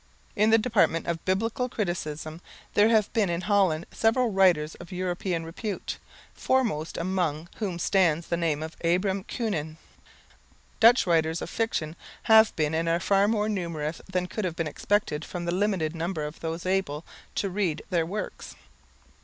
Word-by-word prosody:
In 210 +2 +3
the 225 - +6
department 215 -7 +2
of 170 -1 -3
Biblical 225 +6 0
criticism 160 -6 -4 0.3
there 210 +2 +5
have 215 -3 +2
been 210 -5 +2
in 170 0 -1
Holland 185 -4 +2
several 230 +1 +2
writers 180 -6 +3
of 175 +2 -11
European 180 -2 -2
repute, 195 +5 -5 0.3
foremost 215 -12 0
among 170 -3 -1
whom 195 -6 -3
stands 170 -2 +2
the - - -1
name 160 -3 0
of 160 0 -7
Abraham 185 +3 +1
Kuenen. 160 -11 -3 1.0
Dutch 240 +2 +6
writers 165 -2 +2
of - - -6
fiction 165 -9 -1 0.3
have 220 0 +6
been 155 -1 0
and 165 +1 0
are 165 +1 +2
far 195 +2 +3
more 210 -1 +1
numerous 170 -6 -3
than 180 -1 0
could 215 +4 -4
have 175 -3 -2
been 165 - -1
expected 160 -1 -1
from 175 0 -5
the 170 - -1
limited 185 -5 0
number 165 -1 -2
of 150 +1 -7
those 165 +1 -4
able 185 -5 -1 0.3
to 195 - -1
read 180 -5 -1
their 170 -2 +2
works. 200 +6 -6
180 Hz, 160 wpm, -27 LUFS, 165-205 Hz, 1.0 s, the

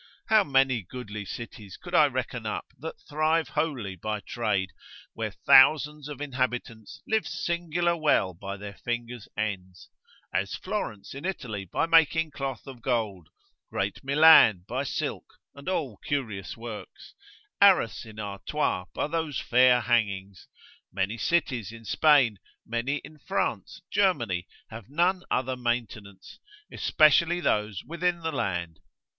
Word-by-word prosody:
How 220 -2 +6
many 135 - +2
goodly 105 0 -7
cities 105 -2 -8
could - - -11
I - - +6
reckon - - -4
up, - - -4
that - - -7
thrive 155 +2 +1
wholly 120 -12 -2
by 105 +4 -3
trade, 100 -3 -2 0.4
where - - -3
thousands 150 +2 +5
of 150 -1 -7
inhabitants 125 -5 -3
live 220 0 0
singular 170 0 -1
well 150 - +2
by 100 +3 -7
their 100 0 -8
fingers' 120 +1 -5
ends: 95 -4 -4 0.4
As 100 +1 -1
Florence 115 - -5
in 140 +2 -8
Italy 115 - -4
by 90 - 0
making 160 -1 +4
cloth 135 -3 -5
of 130 -4 -10
gold; 110 -10 -2 0.4
great - - -3
Milan 140 - +7
by 125 +3 -2
silk, - - -4 0.2
and 140 +4 -7
all 145 - -2
curious 110 -10 -4
works; 115 -2 -9 0.5
Arras 190 - +5
in 110 -2 -12
Artois 100 0 -2
by - - 0
those 155 -4 -2
fair 125 0 +4
hangings; 100 -5 -1 0.4
many 95 +3 -1
cities 130 - 0
in 115 -1 -12
Spain, 130 -4 +4 0.3
many 120 +5 -1
in 150 +2 -13
France, - - -3
Germany, 120 - +1 0.2
have 110 +1 -9
none 175 +5 +2
other 130 0 0
maintenance, 115 -5 -4 0.3
especially 165 +3 +4
those 105 - 0
within 170 +1 -1
the 160 0 -2
land. 85 - -3
120 Hz, 135 wpm, -27 LUFS, 105-155 Hz, 0.5 s, Milan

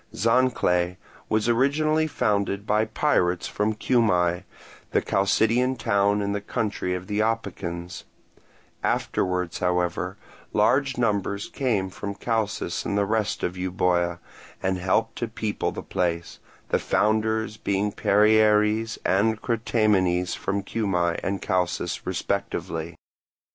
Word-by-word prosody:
Zancle 90 -6 +2 0.3
was 110 +1 +1
originally 155 +6 +2
founded 100 -6 0
by 110 0 +2
pirates 90 - +1
from 105 +1 -1
Cuma, 90 -7 +2 0.5
the - - +4
Chalcidian 115 +6 +2
town 100 -2 +2
in 100 - -1
the 100 0 -2
country 100 -4 -2
of 90 0 -6
the 105 +1 -2
Opicans: 90 -6 -3 0.8
afterwards, 90 -2 -1
however, 90 -1 -1 0.4
large 135 -2 +2
numbers 100 -3 0
came 105 -8 -1
from 100 +1 -5
Chalcis 105 -6 -2
and 100 - -1
the 100 - +2
rest 105 0 -1
of 90 - -1
Euboea, 90 -1 0 0.5
and 95 -1 0
helped 95 +5 0
to 120 - -2
people 110 -2 -2
the - - -7
place; 85 -1 -2 0.3
the - - +2
founders 110 0 +1
being 100 0 0
Perieres 105 +1 +3
and 105 +3 +2
Crataemenes 105 -7 +1
from 100 0 -2
Cuma 90 -6 0
and 95 0 -2
Chalcis 90 -1 -1
respectively. 85 -3 -3
100 Hz, 115 wpm, -25 LUFS, 90-110 Hz, 0.8 s, the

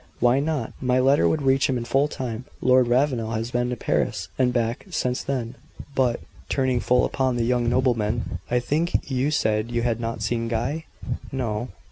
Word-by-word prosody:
"Why 125 +2 +4
not? 145 -5 -2
My 125 0 +2
letter 135 +3 +4
would 155 -2 0
reach 135 0 +3
him 130 - +1
in 120 - -4
full 135 +4 +2
time. 125 -4 -5
Lord 130 -1 +4
Ravenel 120 -3 +1
has 115 +2 -2
been 120 0 0
to 125 - -1
Paris - - -1
and 125 -1 +2
back 120 - -1
since 125 -7 -1
then. 125 -4 -3 0.4
But 125 -3 +1
" - - -23
turning 130 -2 +1
full 125 +1 +3
upon 130 -2 0
the 120 -1 0
young 120 -1 +1
nobleman 120 -6 0
"I 125 - +2
think 155 +3 -1
you 130 +2 +1
said 110 -6 +1
you 120 0 -1
had 120 -2 0
not 115 0 -3
seen 115 -1 -1
Guy?" 125 +8 -2 0.5
"No." 120 -4 -2
125 Hz, 190 wpm, -24 LUFS, 115-135 Hz, 0.5 s, Why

